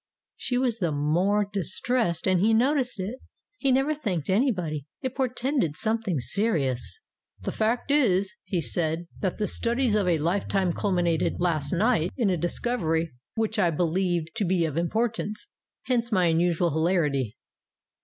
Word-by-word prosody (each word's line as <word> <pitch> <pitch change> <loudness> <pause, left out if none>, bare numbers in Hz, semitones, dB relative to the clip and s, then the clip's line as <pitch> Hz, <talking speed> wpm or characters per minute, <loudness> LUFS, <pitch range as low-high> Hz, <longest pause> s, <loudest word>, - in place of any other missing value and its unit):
She 245 - -2
was 245 -3 0
the 170 -5 0
more 175 +8 +2
distressed 195 - 0
and 185 -1 +3
he 220 +4 +4
noticed 255 -1 +1
it. 210 +8 -4 0.4
He 275 - +2
never 270 +4 +2
thanked 195 - -2
any 250 +8 +3
body. 155 - -4 0.2
It 260 -1 -2
portended 255 - 0
something 220 -7 -1
serious. 150 - 0 0.4
"The - - -1
fact 230 +5 0
is," 200 -10 +3
he 180 -3 -1
said, 160 +5 -1
"that 190 -3 -1
the 215 - 0
studies 235 0 +1
of 205 -3 +2
a 170 -2 +3
life 170 +6 0
time 190 -3 +1
culminated 175 -5 +1
last 155 -5 0
night 185 -2 +2
in 225 -7 +2
a - - +2
discovery 170 - -1 0.2
which 225 0 -1
I 180 -4 +4
be 165 +2 0
lieve 175 -1 0
to - - +1
be 180 -2 +2
of 155 -3 -3
importance. 215 - -1 0.3
Hence 240 -2 0
my 185 -4 +3
unusual 170 0 +2
hilarity." 150 - 0
190 Hz, 160 wpm, -26 LUFS, 165-230 Hz, 0.4 s, he